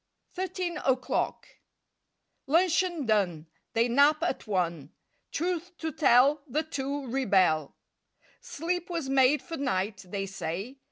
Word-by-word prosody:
THIRTEEN 365 -1 -3
O'CLOCK 260 -1 0 1.0
L 285 - +1
uncheon 345 -3 +2
done, 195 -8 +1
^ - - -26 0.3
They 230 +1 +3
nap 285 +6 +4
at 345 - -2
one; 170 -7 -1 0.4
Truth 355 +1 -3
to 320 -1 -3
tell, 280 0 +4
The 300 +5 -1
two 280 -2 -4
rebel. 190 - +2 0.6
Sleep 355 - -3
was 330 -6 -3
made 270 +2 +4
for 330 -2 -6
night, 205 -6 -2
they 195 +1 -3
say. 195 +7 -5
270 Hz, 125 wpm, -28 LUFS, 200-330 Hz, 1.0 s, nap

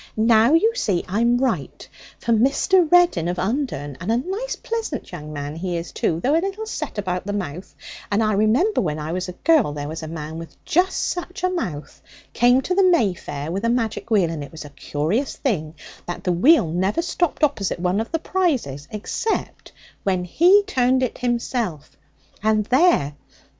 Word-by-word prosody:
Now 225 +4 +4
you 445 +7 +3
see 200 - -1
I'm 235 +6 +2
right. 260 +1 -2 0.3
For 235 - -2
Mr. 300 - +3
Reddin 350 - +4
of 175 +1 -2
Undern 185 - -2
and 190 +5 -1
a 230 - +3
nice 390 - -3
pleasant 450 -10 -4
young 155 -4 -8
man 145 0 -5
he 175 +1 -3
is, 170 +1 -6
too, 165 - -1
though 265 - +1
a 330 - +3
little 395 +3 -4
set 435 - -5
about 185 -2 -3
the 205 - -2
mouth 180 -3 -5 0.4
and 205 +2 +2
I 215 0 +1
remember 225 - +2
when 155 -5 -2
I 155 +1 -4
was 180 +1 -3
a - - -6
girl 305 - +4
there 145 -1 -5
was 160 +2 -6
a 160 - -6
man 160 0 -6
with 165 -3 -10
just 365 +4 +1
such 360 +2 -5
a 365 - +2
mouth 175 - -5 0.3
came 245 +2 +4
to 365 - -2
the 390 - +3
May 335 - +4
fair 145 -2 -6
with 195 +4 -3
a 230 - +2
magic 230 -2 -1
wheel, 195 -7 +3
and 155 -3 -5
it 140 - -10
was 160 -2 -9
a 145 - -11
curious 160 - -2
thing 160 - -2 0.3
that 175 +1 -5
the 180 - +1
wheel 275 - +5
never 190 - 0
stopped 345 -2 -1
opposite 275 -10 +1
one 180 +3 0
of 225 - -6
the 325 - +1
prizes 275 - -1
except 215 - -3 0.3
when 185 -2 0
he 355 - +5
turned 260 -7 +2
it 255 - -3
himself; 235 - -2 0.5
and 215 0 +2
there! 260 - +3
215 Hz, 195 wpm, -22 LUFS, -, 0.5 s, wheel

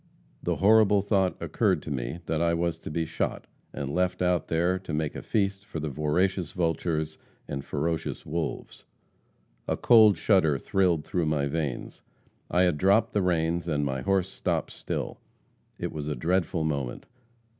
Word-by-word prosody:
The - - 0
horrible 105 -1 +5
thought 95 -3 +1
occurred - - +1
to - - -6
me 70 +6 -3
that 80 0 -1
I 85 0 +2
was 85 -1 -1
to - - -7
be 80 +2 -1
shot, - - -3 0.3
and 70 0 -4
left 90 0 0
out 90 -1 +1
there 85 +3 +1
to 90 -4 -7
make 75 -1 -2
a - - -5
feast 100 -2 -1
for 80 - -6
voracious 80 +5 0
vultures 80 -2 -1 0.3
and 70 -1 -4
ferocious 80 +3 -3
wolves. 80 -1 -4 0.8
A - - 0
cold 110 -4 +6
shudder 85 -9 +3
thrilled 85 0 +1
through 85 -3 -1
my 75 -2 +1
veins. 70 -3 -3 0.5
I 90 +1 +3
had 85 -5 +2
dropped 100 +4 +3
the 105 - +2
reins, 85 -1 0
and 75 -3 0
my 65 -1 -2
horse 95 +5 +1
stopped - - -2
still. - - -4 0.6
It - - -3
was 75 -1 -5
a 75 - -1
dreadful 85 +3 0
moment. 70 -5 -3
85 Hz, 165 wpm, -27 LUFS, 75-95 Hz, 0.8 s, cold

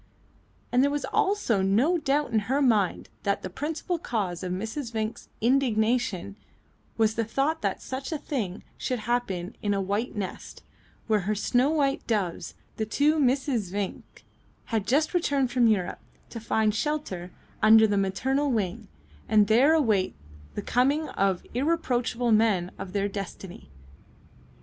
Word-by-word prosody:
And 250 +1 +4
there 285 - +3
was 290 0 -2
also 385 - +1
no 235 - +3
doubt 290 -2 0
in 225 - +3
her 270 +2 +2
mind 220 -9 +2
that 200 -1 -1
the - - -5
principal 320 - -3
cause 195 - -2
of 180 -1 -4
Mrs. 225 +7 -4
Vinck's 220 0 -4
indignation 225 -5 +1 0.6
was 220 -1 +3
the 230 - 0
thought 275 +8 -1
that - - -2
such 265 +3 -5
a 315 - -1
thing 225 -11 -4 0.2
should 255 - -1
happen 215 -6 -2
in 205 -2 0
a - - 0
white 200 +5 -2
nest, 200 -3 -6 0.4
where 215 -2 +2
her 215 - +1
snow 245 +6 +2
white 285 -3 0
doves, 200 -7 -2 0.2
the 220 - -1
two 295 +7 +2
Misses 255 - +1
Vinck, 200 -1 -5 0.5
had 220 -2 0
just 300 +7 +2
returned 280 -7 +1
from 245 -2 +4
Europe, 195 -5 0 0.3
to 230 - -6
find 220 -1 +1
shelter 220 - -2 0.3
under 220 +1 +7
the 205 -1 +1
maternal 260 +9 0
wing, 200 -7 -2 0.4
and 210 -1 +5
there 250 +9 +5
await 215 -11 +2 0.4
the 205 - -3
coming 280 +8 +1
of 195 -2 0
irreproachable 250 -4 0
men 210 -5 +3
of 185 - -7
their 200 -1 +1
destiny. 195 - -7
225 Hz, 150 wpm, -27 LUFS, 200-275 Hz, 0.6 s, under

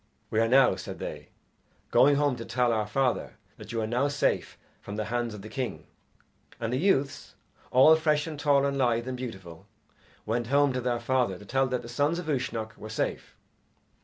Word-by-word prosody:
"We 110 - +1
are 115 - +3
now," 130 +2 +5
said - - -7
they, - - -7 0.6
"going 145 +2 +5
home 145 -2 +2
to 115 - -6
tell 125 0 +1
our 110 -2 0
father 130 +3 0 0.2
that - - -10
you 115 - -2
are - - -1
now 125 +5 +1
safe 145 0 -1 0.2
from 100 - -7
the 110 0 -2
hands 120 -2 -1
of 100 - -10
the - - -8
king." 130 +1 -4 0.7
And 115 +1 -2
the 130 - 0
youths, 145 -6 0 0.3
all 135 +5 +7
fresh 150 -2 +1
and 155 -3 -6
tall 140 -2 +3
and 140 0 -1
lithe 120 -1 +1
and 130 - -3
beautiful, 95 -10 -8 0.6
went 115 +2 -1
home 140 +1 +3
to 125 - -2
their 120 -1 -1
father 120 -5 0
to 100 - -13
tell 135 +5 +1
that 125 -1 -2
the - - -9
sons 145 +7 0
of 175 - -5
Uisnech 115 -6 -2
were 110 - -8
safe. 110 - -3
125 Hz, 200 wpm, -28 LUFS, 115-140 Hz, 0.7 s, all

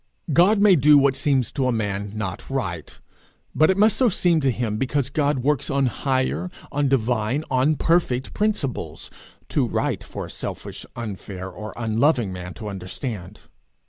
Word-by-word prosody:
God 190 +7 +5
may 200 -2 +6
do 150 0 +6
what 140 -1 +4
seems 135 -2 +1
to 135 -2 0
a - - +2
man 100 -3 -2
not 105 -3 -5
right, 90 - -4 0.5
but 155 - +4
it 190 - +2
must 215 +2 +5
so 255 -3 +4
seem 175 -4 +2
to 135 - +2
him 115 -3 -1
because 135 +2 -1
God 145 -3 0
works 145 -2 +1
on 140 0 +2
higher, 130 +7 -1 0.2
on 145 0 +1
divine, 125 +1 +1
on 130 +4 +3
perfect 145 -6 +1
principles, 210 - -2 0.4
too - - +1
right - - -1
for - - -6
a - - -11
selfish, - - -6
unfair, 95 -4 -6
or 105 +4 -7
unloving 115 -1 +1
man 90 -1 -7
to 110 - -7
understand. 95 +1 -6
130 Hz, 165 wpm, -23 LUFS, 105-150 Hz, 0.5 s, may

